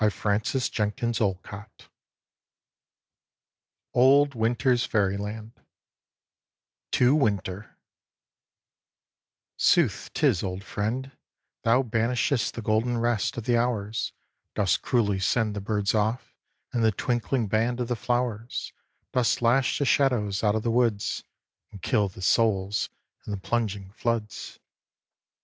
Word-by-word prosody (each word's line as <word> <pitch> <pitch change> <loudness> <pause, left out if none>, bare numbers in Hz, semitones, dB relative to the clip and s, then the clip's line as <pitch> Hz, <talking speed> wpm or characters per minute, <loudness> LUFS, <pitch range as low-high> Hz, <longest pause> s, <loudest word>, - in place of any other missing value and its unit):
James 105 -2 +1
Clarence 110 +5 0
Mangan 110 +2 0 2.7
OLD 140 +3 +5
WINTER'S 120 +2 +1
FAIRYLAND 105 +2 -1 1.4
TO 125 +2 +4
WINTER 105 -7 -1 1.8
Sooth - - +2
'tis, 85 - +2
old 95 0 -4
Friend, 115 +7 -3 0.5
Thou 125 +4 +4
banishest 115 +1 0
The 115 - -5
golden 110 +3 +1
rest 120 -2 0
Of 120 - -3
the 120 +2 +2
hours; 115 -2 -1 0.4
Dost 100 -3 +1
cruelly 105 -6 +1
send 105 +2 +1
The 100 - -3
birds 105 0 0
off, 110 +3 -1 0.4
and 120 -2 +1
The 110 - +4
twinkling 120 +2 -1
band 115 +4 0
Of 120 - -1
the 120 - -1
flowers; 120 -1 -2 0.4
Dost 125 -2 +2
lash 125 +3 +3
the 140 - 0
shadows 120 -8 +2
out 105 0 +3
of 110 - -1
the 115 - 0
woods, 115 -4 0 0.5
And 100 - -10
kill 105 -1 +1
the 95 -1 -10
souls 105 -2 +2 0.4
in - - -4
the - - -2
plunging 100 -2 -2
floods. 115 -1 -3
115 Hz, 115 wpm, -26 LUFS, 105-120 Hz, 2.7 s, OLD